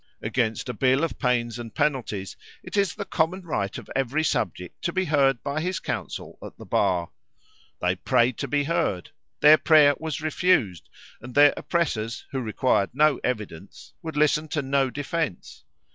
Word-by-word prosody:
Against 115 -1 -1
a 125 - -3
bill 130 +5 +2
of 165 - -3
pains 120 -3 0
and 115 -1 -8
penalties, 130 -10 -1 0.3
it - - -7
is 200 -2 +1
the 205 - -5
common 180 +3 -1
right 100 - -3
of - - -10
every 135 +4 0
subject 90 - -2
to 170 - 0
be 185 +1 0
heard 135 -5 +2
by 145 +2 -2
his 180 +1 -2
counsel - - -5
at - - -10
the - - -11
bar. 85 -2 0 0.7
They - - +1
prayed 120 0 +1
to 140 - -2
be 145 +2 +1
heard. 140 - -1 0.3
Their 150 +1 +8
prayer 150 -3 +6
was 160 -1 -4
refused, 155 - +1 0.3
and 120 +2 -10
their 145 0 +7
oppressors, 120 -10 -2
who 135 -2 -2
required 110 -3 +1
no 150 -1 +3
evidence, 105 -7 -5
would 160 -3 -6
listen 150 +1 +2
to 150 -1 -2
no 135 0 +1
defence. 145 - -4
140 Hz, 170 wpm, -25 LUFS, 120-155 Hz, 0.7 s, Their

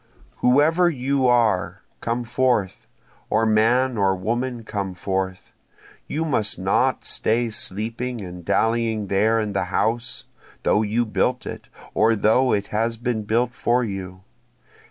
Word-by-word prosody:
Whoever 155 +8 +4
you 135 -2 0
are, 100 -6 +2 0.2
come 120 +1 -2
forth! 120 -5 0 0.4
or 110 +1 +2
man 115 +3 +2
or 95 -1 +3
woman 120 +5 -2
come 100 -4 -4
forth! 95 +1 -3 0.5
You 160 +2 -2
must 110 -9 0
not - - +1
stay 115 +1 0
sleeping 115 +4 -3
and 90 -3 -8
dallying 115 +1 0
there 110 +3 +2
in 105 -2 -2
the 100 - 0
house, 115 +4 -1 0.4
though 105 - +3
you 110 +3 0
built 125 +3 0
it, - - -7 0.3
or 115 +1 +3
though 110 +5 +3
it 100 0 0
has 115 +2 0
been 115 -2 -2
built 120 +3 +1
for 125 +1 +1
you. 95 -3 -6
115 Hz, 135 wpm, -23 LUFS, 100-125 Hz, 0.5 s, Whoever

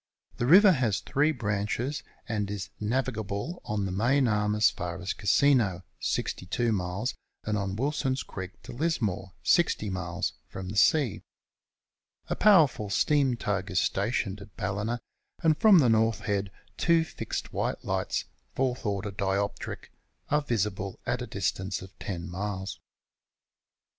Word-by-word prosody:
The 120 - 0
river 190 +6 +8
has 120 - +1
three 150 +3 +1
branches, 110 +4 -2 0.3
and 105 -3 -1
is 100 -1 -5
navigable 110 - -2
on 105 -2 -1
the 95 - -3
main 125 +7 +3
arm 105 -1 +1
as 105 0 +5
far 85 0 -5
as 90 +1 -2
Casino, 100 -3 +3 0.2
62 115 +6 -1
miles, 95 +4 -1 0.3
and 105 - -1
on 100 -2 -2
Wilson's 135 +1 -1
Creek 95 -1 -8
to - - -9
Lismore, 110 - -1
60 155 - +2
miles, 90 -3 -2
from 95 -1 -7
the 100 - -5
sea. 120 - +3 1.1
A - - 0
powerful 155 - +5
steam 135 +3 +2
tug 100 -4 -2
is 90 - +2
stationed 100 0 0
at 100 -1 -14
Ballina, 105 +5 -2 0.4
and 160 -2 +5
from 215 +1 +7
the 140 -7 +5
North 115 0 +3
Head, 100 -4 -1 0.3
2 170 -1 +4
fixed - - -5
white - - -2
lights, - - -1 0.3
fourth 125 -3 0
order 100 0 -2
dioptric, 100 0 -2 0.4
are 150 +1 +3
visible 100 -7 -2
at - - -1
a - - -4
distance 95 0 -2
of 95 - -11
10 85 -4 -4
miles. 95 +1 -4
105 Hz, 145 wpm, -28 LUFS, 95-130 Hz, 1.1 s, river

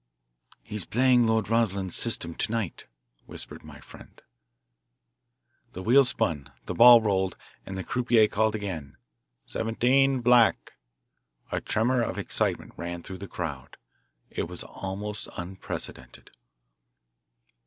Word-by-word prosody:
"He's 105 -2 -2
playing 125 0 +3
Lord 110 -2 +1
Rosslyn's 100 -5 0
system, 85 -8 +3
to 105 - -2
night," 115 -6 -3 0.4
whispered - - -9
my - - -12
friend. - - -15 1.5
The 95 - -7
wheel 130 +6 +6
spun, 75 - -1
the - - -4
ball 120 0 +8
rolled, 95 -4 0 0.3
and 95 - -6
the 95 - -4
croupier 120 -2 +2
called 110 +1 0
again, 90 - -6 0.5
"Seventeen, 130 +4 +1
black." 120 -1 +3 0.8
A - - -2
tremor 120 +3 +1
of 115 - -3
excitement - - -1
ran 85 0 -6
through 95 -1 -9
the 100 - -7
crowd. 75 -9 -6 0.5
It - - -3
was - - -5
almost 100 +2 -6
unprecedented. 90 +2 -7
105 Hz, 120 wpm, -26 LUFS, 95-120 Hz, 1.5 s, ball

